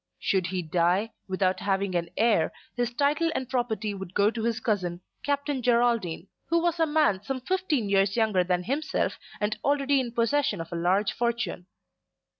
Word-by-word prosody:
Should 185 -3 0
he 180 0 -2
die, 175 +6 +1 0.2
without 185 -1 0
having 195 -1 0
an 170 -1 -1
heir, 215 -8 +3 0.2
his 245 -1 0
title 295 +6 +1
and 260 - -2
property 230 -4 -1
would 190 -2 -8
go 205 +1 +4
to 230 -1 -4
his 230 -1 0
cousin, 185 -6 -1 0.2
Captain 285 -1 -1
Geraldine, 235 -8 +1 0.2
who 335 - +3
was 340 0 0
a 325 - +3
man 295 -11 +2
some 265 +4 -3
fifteen 310 - 0
years 195 +1 +2
younger 215 -5 +3
than 180 0 0
himself 285 - -1 0.2
and 210 +1 -1
already 280 -1 +2
in 245 -2 -2
possession 235 -2 +1
of 165 0 -6
a - - -2
large 185 +5 +2
fortune. 235 -6 -2
220 Hz, 175 wpm, -27 LUFS, 190-265 Hz, 0.2 s, go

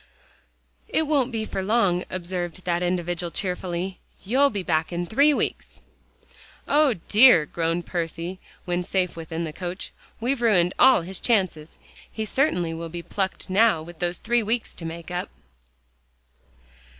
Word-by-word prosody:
"It 320 - +1
won't 280 -4 +1
be 220 -2 -2
for 195 - -3
long," 190 -3 +2
observed 180 -1 -5
that 175 -1 0
individual 175 -1 -1
cheerfully, 180 0 -3 0.3
"you'll 270 +7 +4
be 200 -6 -4
back 160 -1 0
in 175 0 -2
three 280 - +4
weeks." 290 - -2 0.8
"O 290 -4 +4
dear!" 215 -8 +7
groaned 165 +2 -2
Percy 170 +1 -4 0.3
when 175 0 -1
safe 185 -1 -1
within 165 0 -5
the 155 -2 -5
coach, 180 +2 -6 0.3
"we've 245 +2 -1
ruined 185 -6 +3
all 260 -6 +7
his 185 +2 -4
chances. 185 -9 0 0.3
He 220 - -4
certainly 180 - +1
will 165 0 -6
be 170 +1 -6
plucked 190 +1 -3
now 195 -4 +3
with 170 0 -12
those 175 0 -1
three 240 +1 +1
weeks 225 +2 -2
to 165 - -9
make 165 +1 -7
up." 180 +1 -3
180 Hz, 150 wpm, -24 LUFS, 170-220 Hz, 0.8 s, dear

